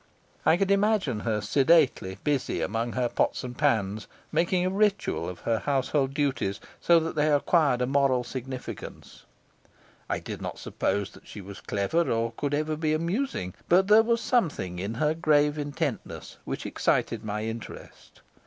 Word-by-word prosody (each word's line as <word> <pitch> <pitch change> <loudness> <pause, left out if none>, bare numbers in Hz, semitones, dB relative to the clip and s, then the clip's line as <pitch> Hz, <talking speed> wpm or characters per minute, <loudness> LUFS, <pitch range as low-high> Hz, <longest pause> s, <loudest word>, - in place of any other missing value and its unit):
I 165 - +6
could 195 +1 +1
imagine 200 - +2
her 105 -1 -1
sedately 130 - +3
busy 145 -3 0
among 115 +3 -2
her 125 -1 +1
pots - - 0
and 125 -1 -6
pans, 110 -8 0 0.2
making 175 +3 +1
a - - +2
ritual 200 - +1
of 90 -1 -9
her 115 -1 0
household 135 +2 0
duties, 135 -9 0 0.2
so 170 -1 +5
that 165 0 -3
they 155 0 +2
acquired 145 -3 +3
a - - +2
moral 135 -1 +2
significance; 130 +1 -8 0.8
I - - 0
did - - -7
not - - -5
suppose 100 +1 -2
that - - -17
she - - -9
was 100 +1 -10
clever 160 +13 0
or 115 0 0
could 145 +4 -2
ever 155 +1 -1
be 155 0 0
amusing, 170 - -2 0.2
but 190 +3 +4
there 215 +1 +8
was 230 +1 +1
something 145 - 0
in 100 +5 -3
her 150 +5 +1
grave 150 -2 +2
intentness 145 -2 -4
which - - -4
excited - - 0
my 105 0 -3
interest. 115 0 -8
140 Hz, 160 wpm, -27 LUFS, 115-165 Hz, 0.8 s, there